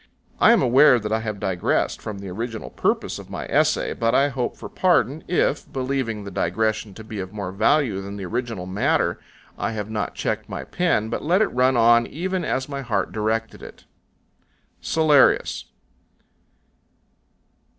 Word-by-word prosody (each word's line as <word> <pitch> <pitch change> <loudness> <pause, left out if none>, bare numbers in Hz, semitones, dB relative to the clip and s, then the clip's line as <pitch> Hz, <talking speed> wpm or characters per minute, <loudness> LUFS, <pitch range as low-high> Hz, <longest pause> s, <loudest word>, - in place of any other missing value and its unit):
I - - +7
am - - +4
aware 130 +2 +6
that 105 -2 -4
I 110 - +1
have 110 -2 -5
digressed 95 -3 -1
from 105 -2 -6
the 100 -1 -7
original 115 +4 -5
purpose - - -1
of - - -12
my - - -5
essay, - - +1
but 115 0 0
I 140 +1 +4
hope 130 -3 -3
for - - -8
pardon, 160 -5 +1
if, 170 -4 0
believing 130 -5 -2
the 100 - -8
digression 110 +3 -1
to 110 - -10
be 110 -1 -7
of 95 0 -5
more 100 -3 -4
value 110 +1 +2
than 100 +1 -7
the 100 - -5
original 115 -2 -3
matter, 95 +2 0 0.4
I 115 - -2
have 105 0 -5
not 105 -1 -3
checked - - -3
my - - -5
pen, 170 -12 0
but - - -3
let 180 +7 +3
it - - -3
run 130 +1 +3
on 115 0 +5
even 185 +3 -3
as 130 -4 -1
my 140 -1 -5
heart 105 -7 -1
directed 110 +1 -2
it. - - -12 1.0
CELLARIUS. 155 -4 +3
115 Hz, 170 wpm, -23 LUFS, 105-135 Hz, 1.0 s, I